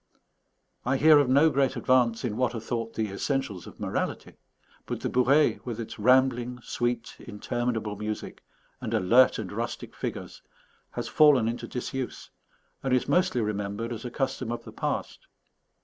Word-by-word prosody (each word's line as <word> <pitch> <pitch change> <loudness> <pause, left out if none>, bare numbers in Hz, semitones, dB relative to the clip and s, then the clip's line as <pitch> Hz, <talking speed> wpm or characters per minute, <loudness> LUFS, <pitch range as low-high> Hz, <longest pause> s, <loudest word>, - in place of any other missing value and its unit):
I 130 +2 +1
hear 155 +1 +7
of 140 -3 +2
no 145 +5 +5
great 135 -2 +1
advance 125 -2 +2
in 110 -4 -2
what 125 0 0
are - - -2
thought 115 0 -4
the 110 -3 -2
essentials 105 - -2
of - - -13
morality; - - -3 0.5
but - - -4
the - - -2
bourrée, 135 +4 +3
with 120 -2 -5
its 115 -1 -7
rambling, 125 +1 +3
sweet, 120 -1 -2
interminable 110 0 -3
music, 105 +1 -5 0.4
and - - -2
alert 120 +8 +5
and 105 -4 -5
rustic 115 +3 -5
figures, - - -6 0.5
has - - -4
fallen 145 -7 +5
into 115 +1 -3
disuse, 130 +1 -5 0.5
and 130 -1 +1
is 125 - 0
mostly 180 -9 +2
remembered 105 +2 -3
as 115 - -7
a 125 - -4
custom 130 -2 -2
of 120 - -4
the - - -11
past. - - -4
120 Hz, 160 wpm, -27 LUFS, 110-130 Hz, 0.5 s, hear